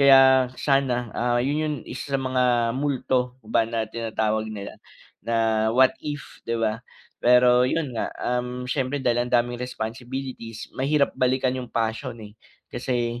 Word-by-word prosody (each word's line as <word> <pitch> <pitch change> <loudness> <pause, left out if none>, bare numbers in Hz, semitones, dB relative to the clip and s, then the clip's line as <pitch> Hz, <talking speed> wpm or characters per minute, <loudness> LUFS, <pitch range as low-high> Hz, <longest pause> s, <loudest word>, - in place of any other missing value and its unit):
Kaya 135 -2 +7
sana, 130 -5 +1
ah, 120 0 +1
yun 145 +3 0
'yung 155 -1 -1
isa 135 +2 -3
sa - - -4
mga 125 -3 +1
multo 130 -2 -1
ba 115 +1 +1
na 115 -1 -1
tinatawag 110 -1 -2
nila, 100 -2 -8 0.4
na 110 -1 +1
what 130 0 +6
if, 145 -1 -7
'di 115 - +1
ba. 110 0 -1 0.4
Pero 125 0 +5
'yun 150 -4 -1
nga, 115 - -2
um, 125 0 -2
siyempre 130 +1 -1
dahil 120 0 +1
ang - - -13
daming 120 0 0
responsibilities, 125 -1 -6
mahirap 140 +2 +1
balikan 130 0 +1
'yung 130 -1 -5
passion, 115 +2 -2
eh. 105 - -12 0.4
Kasi, 120 -2 -2
125 Hz, 150 wpm, -24 LUFS, 115-130 Hz, 0.4 s, Kaya